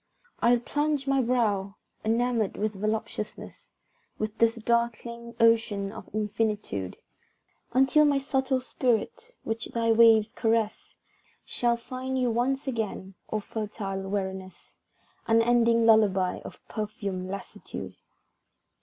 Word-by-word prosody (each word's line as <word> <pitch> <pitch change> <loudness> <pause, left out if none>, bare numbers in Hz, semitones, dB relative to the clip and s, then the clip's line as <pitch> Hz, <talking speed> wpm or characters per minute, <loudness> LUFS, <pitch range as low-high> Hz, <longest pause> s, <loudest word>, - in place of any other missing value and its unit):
I'll 240 +1 +4
plunge 290 +2 -1
my 275 -1 +2
brow, 210 -5 0 0.3
enamoured 230 -1 +1
with 215 +1 -1
voluptuousness 215 +1 -4 0.5
Within 215 0 -3
this 230 0 +4
darkling 235 0 -2
ocean 225 -3 +3
of 220 - -10
infinitude, 210 - -2 0.8
Until 270 +4 +5
my 285 -1 +3
subtle 265 -1 0
spirit, 255 - -1
which 225 +1 -3
thy 230 -1 0
waves 225 -1 +6
caress, 225 -3 -1 0.5
Shall 240 -1 0
find 255 +2 -4
you 250 -2 +2
once 260 +4 0
again, 215 -6 -3 0.2
O 215 - -1
fertile 205 -2 -4
weariness; 190 -2 -5 0.6
Unending 230 0 +4
lullabye 200 -5 +4
of - - -10
perfumed 200 -4 -4
lassitude! 195 +1 -7
225 Hz, 110 wpm, -27 LUFS, 210-240 Hz, 0.8 s, waves